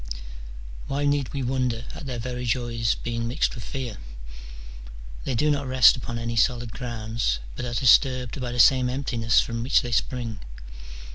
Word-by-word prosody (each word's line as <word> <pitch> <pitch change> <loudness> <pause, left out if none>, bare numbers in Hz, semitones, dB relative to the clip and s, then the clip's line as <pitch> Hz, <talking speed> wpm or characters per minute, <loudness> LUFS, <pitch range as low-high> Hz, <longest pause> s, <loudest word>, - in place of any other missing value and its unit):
Why 140 +1 -1
need 145 -3 +1
we 140 -2 -3
wonder 125 -2 -1
at 140 - -8
their 125 -2 -4
very 125 +1 -4
joys 115 -1 0
being 115 -1 -3
mixed 125 +6 0
with 115 - -8
fear? 125 -5 -5 1.3
they 130 - -1
do 150 +6 +2
not 145 -2 -1
rest 130 -2 +6
upon 115 0 -5
any 115 0 -3
solid 120 0 +1
grounds, 115 - -2 0.2
but - - -4
are 120 -1 -4
disturbed 125 +1 +3
by 125 -1 -3
the 120 - -5
same 130 +1 +5
emptiness 125 -3 +1
from 115 -1 -4
which 125 +4 +3
they 120 - -4
spring. 115 -2 -2
120 Hz, 165 wpm, -25 LUFS, 115-130 Hz, 1.3 s, rest